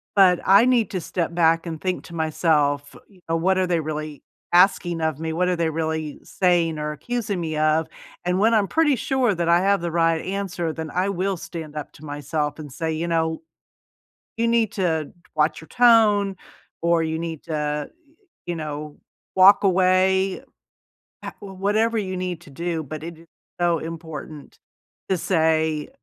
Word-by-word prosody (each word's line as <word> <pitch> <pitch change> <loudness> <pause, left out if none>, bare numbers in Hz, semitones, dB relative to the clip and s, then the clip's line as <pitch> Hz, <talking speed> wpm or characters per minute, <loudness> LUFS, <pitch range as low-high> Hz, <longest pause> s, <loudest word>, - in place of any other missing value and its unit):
but 185 -3 +6
I 200 +5 +6
need 245 -3 +3
to 185 -3 -2
step 170 +1 -3
back 165 0 +3
and 160 -1 -5
think 185 -1 -2
to 170 - -10
myself, 150 -3 +1
you 195 -3 -22
know, 165 - +1
"What 185 +3 +2
are 185 -1 +1
they 175 -2 +1
really 155 -1 -5 0.3
asking 175 -2 +4
of 160 -2 -1
me? 160 0 -3
What 180 +2 +1
are 180 - +1
they 165 -1 +1
really 160 -1 -3
saying 170 -4 +1
or 150 0 -2
accusing 205 - -3
me 160 -2 -3
of," 155 +1 +2 0.4
and 180 +1 0
when 225 +2 +4
I'm 205 -3 +3
pretty 315 -4 +3
sure 250 -3 +1
that 170 -1 -1
I 170 +1 +5
have 195 -1 +2
the 170 - -3
right 165 -1 +2
answer, 185 -4 -3
then 160 -1 -6
I 185 +2 0
will 195 +1 -1
stand 160 -3 -8
up 150 - -6
to 155 - -13
myself 145 +1 -3
and 145 -3 -8
say, 160 +4 -3
"You 165 +2 -2
know, 160 -1 0 1.0
you 230 0 +1
need 230 -3 +2
to 160 -6 -1 0.2
watch 155 0 +1
your 160 - -14
tone, 215 -5 +4 0.5
or 170 -1 +3
you 160 0 -2
need 165 -2 -5
to, 150 -2 -2 0.6
you 175 - -2
know, 150 -1 -6 0.4
walk 195 +2 +7
away," 190 0 +3 0.8
uh, - - -5
w 195 -1 -9
whatever 215 +4 +1
you 185 -3 -2
need 180 -2 -4
to 155 - -15
do, 165 +2 -3
but 155 +2 -7
it 170 0 -7
is 165 - -18 0.3
so 170 -2 +2
important 160 -2 -8 0.5
to 190 - +2
say 160 -2 +1
170 Hz, 180 wpm, -23 LUFS, 160-190 Hz, 1.0 s, walk